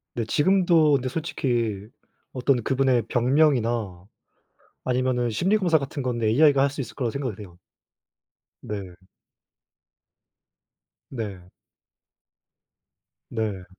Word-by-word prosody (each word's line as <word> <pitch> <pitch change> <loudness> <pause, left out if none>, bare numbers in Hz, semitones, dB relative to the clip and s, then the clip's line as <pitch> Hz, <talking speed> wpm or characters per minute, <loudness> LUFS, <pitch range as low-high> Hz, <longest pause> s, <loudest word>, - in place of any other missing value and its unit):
네 115 - -2
지금도 170 - +3
근데 130 -1 -1
솔직히 120 -9 -2 0.5
어떤 130 -1 +1
그분의 130 -3 +2
병명이나 120 - +1 0.8
아니면은 125 -1 0
심리검사 180 - +2
같은 140 0 -5
건데 120 -3 -1
AI가 140 +3 +4
할 140 - +2
수 145 - -7
있을 130 - -6
거라고 120 -4 -2
생각을 125 -6 -4
해요. 90 -4 -12 1.0
네. 95 -4 -7 2.1
네. 100 -8 -7 1.8
네. 105 -5 -3
125 Hz, 210 characters per minute, -24 LUFS, 110-140 Hz, 2.1 s, AI가